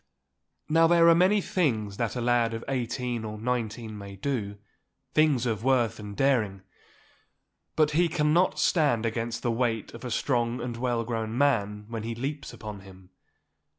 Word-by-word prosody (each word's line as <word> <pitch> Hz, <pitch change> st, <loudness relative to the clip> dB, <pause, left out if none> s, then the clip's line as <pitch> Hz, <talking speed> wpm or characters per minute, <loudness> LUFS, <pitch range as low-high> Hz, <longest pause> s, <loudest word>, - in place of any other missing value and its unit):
Now 165 Hz, +1 st, +4 dB
there 170 Hz, 0 st, +5 dB
are -, -, +8 dB
many 185 Hz, +5 st, +4 dB
things 110 Hz, -, -1 dB
that 115 Hz, -1 st, -2 dB
a 125 Hz, -, -2 dB
lad 120 Hz, -1 st, +2 dB
of 115 Hz, -, -6 dB
eighteen 125 Hz, -2 st, -2 dB
or 110 Hz, -1 st, -5 dB
nineteen 115 Hz, -1 st, -3 dB
may 100 Hz, -1 st, -9 dB
do—things 130 Hz, +5 st, -2 dB
of 110 Hz, -2 st, -2 dB
worth 120 Hz, -4 st, +2 dB
and 105 Hz, -1 st, -8 dB
daring—but 120 Hz, +5 st, -3 dB
he 170 Hz, +3 st, +3 dB
cannot 155 Hz, +4 st, +2 dB
stand 145 Hz, -9 st, +2 dB
against 115 Hz, +1 st, -3 dB
the 120 Hz, -, +1 dB
weight 115 Hz, -2 st, -1 dB
of 115 Hz, +1 st, -10 dB
a 125 Hz, -, -4 dB
strong 120 Hz, 0 st, 0 dB
and 120 Hz, -1 st, -4 dB
well 120 Hz, -1 st, -1 dB
grown 115 Hz, -1 st, -3 dB
man 105 Hz, -7 st, +1 dB
when 115 Hz, -1 st, -5 dB
he 115 Hz, +1 st, -4 dB
leaps 140 Hz, +4 st, -4 dB
upon 105 Hz, -2 st, -8 dB
him. 95 Hz, -1 st, -15 dB
120 Hz, 155 wpm, -27 LUFS, 110-135 Hz, -, are